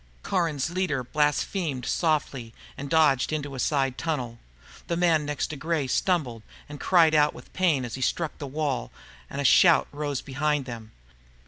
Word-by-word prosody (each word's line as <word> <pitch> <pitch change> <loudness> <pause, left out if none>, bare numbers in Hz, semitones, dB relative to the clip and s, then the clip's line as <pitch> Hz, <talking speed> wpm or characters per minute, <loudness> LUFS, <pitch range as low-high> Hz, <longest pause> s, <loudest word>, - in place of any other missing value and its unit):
Caron's 165 -5 -1
leader 175 -8 -1
blasphemed 150 - -1
softly 140 -7 -1 0.2
and 140 0 -7
dodged 150 -5 +3
into 145 -2 -3
a 130 - -6
side 135 -2 0
tunnel. 125 -8 -3 0.5
The 170 - -1
man 165 -4 +2
next 145 -2 -1
to - - -5
Gray 160 0 -1
stumbled 130 - 0 0.3
and 145 -1 -9
cried 165 -4 +4
out 150 -1 +3
with - - -14
pain 160 -9 +1
as 120 - -7
he 130 - -5
struck 160 +5 -1
the 145 - -5
wall, 140 - -2 0.4
and - - -6
a - - -1
shout 170 +4 +6
rose 145 -2 -3
behind 145 +1 -1
them. 115 -3 -8
150 Hz, 165 wpm, -26 LUFS, 130-160 Hz, 0.5 s, shout